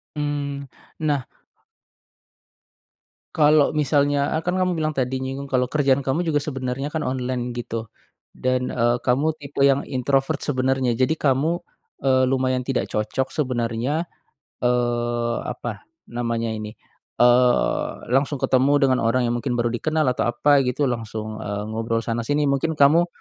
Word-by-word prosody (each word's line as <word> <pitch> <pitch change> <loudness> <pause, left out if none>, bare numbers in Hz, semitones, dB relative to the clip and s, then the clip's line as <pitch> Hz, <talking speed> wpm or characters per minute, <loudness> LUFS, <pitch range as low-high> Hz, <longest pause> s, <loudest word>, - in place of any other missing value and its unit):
Mmm, 145 -1 -3 0.3
nah 145 -4 0 2.1
kalau 150 -2 +4
misalnya, 145 -1 +2
eee, - - -6
kan 180 - +1
kamu 185 -1 +1
bilang 155 -1 -1
tadi, 130 0 -1
nyinggung 135 +1 -5
kalau 125 -1 +2
kerjaan 140 -1 +2
kamu 140 +5 -1
juga 160 -3 +1
sebenarnya 135 -1 -3
kan 160 - -1
online 125 -1 -2
gitu. 115 -2 -5 0.4
Dan, 130 0 -1
eee, 120 0 +2
kamu 140 +5 +1
tipe 145 -1 -8
yang 140 0 +2
introvert, 135 +3 0
sebenarnya. 130 -3 0
Jadi, 130 +6 +1
kamu, 150 +5 +1 0.4
eee, 130 -1 +4
lumayan 130 -1 +1
tidak 130 0 -1
cocok 110 +5 -2
sebenarnya, 130 +3 -1 0.6
eee, 120 -1 0
apa 120 -3 -6 0.2
namanya 115 -1 -2
ini, 110 -1 -5 0.5
eee, 125 0 +3 0.2
langsung 135 +2 +1
ketemu 135 +2 +3
dengan 130 -2 +4
orang 115 +3 +2
yang 120 0 0
mungkin 125 0 -2
baru 120 0 +1
dikenal, 155 +5 0
atau 125 - -1
apa 145 +3 +4
gitu, 135 +3 0
langsung, 110 -2 -5
eee, 105 -1 -4
ngobrol 115 +1 -1
sana-sini, 120 +6 0
mungkin 155 +4 0
kamu 155 +4 +5
130 Hz, 140 wpm, -23 LUFS, 120-145 Hz, 2.1 s, kamu